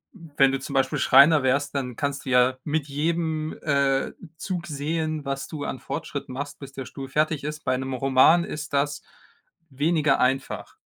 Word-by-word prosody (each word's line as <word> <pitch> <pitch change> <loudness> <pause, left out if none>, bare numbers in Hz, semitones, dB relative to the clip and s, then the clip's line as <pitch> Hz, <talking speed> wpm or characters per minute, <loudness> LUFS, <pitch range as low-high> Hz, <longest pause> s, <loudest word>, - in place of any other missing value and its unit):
wenn 145 -7 +1
du 135 - -1
zum 135 - -7
Beispiel 135 0 +1
Schreiner 140 +3 +6
wärst, 140 +2 +1
dann 125 -4 -3
kannst 140 -1 -3
du - - -4
ja 125 0 +4
mit 150 -1 -1
jedem, 155 +1 -1
äh, 140 -2 +1 0.3
Zug 180 -3 -4
sehen, 155 +1 -2
was 135 0 -3
du 150 -3 -6
an 130 - -4
Fortschritt 145 -4 -5
machst, 140 +2 -6
bis 140 -1 -9
der 135 -1 -7
Stuhl 135 +2 -8
fertig 155 +1 0
ist. 150 +1 -5
Bei 130 - +1
'nem 130 +1 -4
Roman 135 +6 +5
ist 150 -2 -6
das 145 +1 0 0.7
weniger 150 0 +2
einfach. 130 +1 -1
140 Hz, 175 wpm, -25 LUFS, 135-155 Hz, 0.7 s, Schreiner